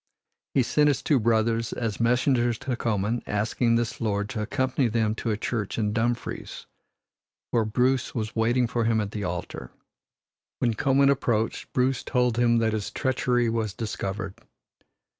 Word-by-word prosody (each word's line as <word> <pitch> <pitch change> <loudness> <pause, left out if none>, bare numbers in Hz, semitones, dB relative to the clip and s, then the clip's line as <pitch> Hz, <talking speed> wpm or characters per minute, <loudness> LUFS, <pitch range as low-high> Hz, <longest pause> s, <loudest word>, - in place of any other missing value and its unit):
He 130 - +4
sent 150 +5 +3
his 140 -4 +1
two 145 -4 +3
brothers 115 0 +1
as 115 -4 -3
messengers 120 0 +2
to 130 +1 -3
Comyn, 110 0 -1
asking 110 +3 +1
this 115 0 -1
lord 105 -2 -1
to 110 - -3
accompany 130 +3 0
them 110 -1 +1
to 115 - -4
a 105 - 0
church 110 -2 -3
in 105 -2 0
Dumfries, 120 +1 -2 0.9
where 115 -2 +2
Bruce 125 +4 +1
was 110 -2 -3
waiting 120 +2 +2
for 115 0 -1
him 115 -1 +2
at 105 -2 -2
the 105 -2 -4
altar. 90 -1 -5 0.9
When 120 -2 +1
Comyn 140 +4 +3
approached, 115 -5 -1
Bruce 130 0 +1
told 125 -2 +1
him 120 -1 +4
that 110 -1 +1
his 105 -2 -2
treachery 125 -3 0
was 115 -3 -1
discovered. 100 -4 -4
115 Hz, 160 wpm, -26 LUFS, 110-125 Hz, 0.9 s, He